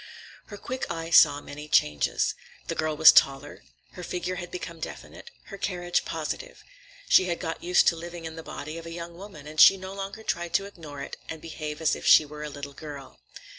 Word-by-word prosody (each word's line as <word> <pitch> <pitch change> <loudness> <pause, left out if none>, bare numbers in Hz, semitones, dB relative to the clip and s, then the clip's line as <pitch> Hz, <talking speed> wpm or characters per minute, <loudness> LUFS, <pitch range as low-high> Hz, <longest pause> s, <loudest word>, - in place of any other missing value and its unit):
Her 205 - -9
quick 255 +5 -5
eye 165 0 -5
saw 145 -3 +6
many 150 +1 -9
changes. 75 - +2 0.3
The - - -3
girl 155 -1 -2
was 160 - +10
taller, 135 0 +2 0.3
her - - -10
figure 180 +1 -4
had 175 0 -6
become 170 -2 -7
definite, 315 - -9 0.2
her 200 - -9
carriage 175 -2 -1
positive. - - -5 0.4
She 185 - +6
had 175 -2 -2
got 165 -2 -4
used 180 +1 +4
to - - -3
living 170 0 -8
in 160 0 -6
the 165 - -7
body 155 0 -7
of 165 - -10
a - - -7
young 170 0 -7
woman, 180 -5 -11
and 155 0 +1
she 195 - +9
no 190 0 -8
longer 195 +2 -7
tried 175 -4 -2
to 195 - +2
ignore 155 -8 -9
it - - -8
and 160 - -6
behave 155 -1 -7
as 160 - +2
if - - -6
she 155 - +8
were 150 +1 -10
a 150 - -5
little 140 0 -8
girl. 140 -2 -10
165 Hz, 210 wpm, -26 LUFS, 150-180 Hz, 0.4 s, was